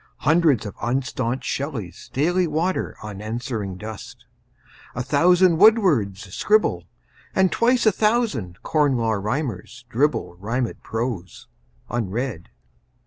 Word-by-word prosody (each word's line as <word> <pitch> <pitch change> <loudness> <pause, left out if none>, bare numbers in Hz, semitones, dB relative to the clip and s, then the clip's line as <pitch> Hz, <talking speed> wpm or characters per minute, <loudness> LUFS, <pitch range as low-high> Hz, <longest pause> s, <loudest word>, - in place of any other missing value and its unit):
Hundreds 155 -6 +3
of 105 - -5
unstaunched 130 0 -1
Shelleys 115 - -4
daily 175 +6 +1
water 165 +5 -1
Unanswering 105 -1 -4
dust; 110 +1 -9 0.7
a 125 - -2
thousand 170 +5 +4
Wordsworths 155 - +4
scribble; 205 - +2 0.5
And 190 -1 +3
twice 240 +1 +2
a 220 - +6
thousand 185 - 0
Corn 145 -4 +2
Law 115 -1 0
Rhymers 120 - -3
dribble 130 - 0
Rhymed 115 +6 -3
prose, 110 -6 -4 0.4
unread. 115 -3 -3
125 Hz, 105 wpm, -23 LUFS, 105-165 Hz, 0.7 s, a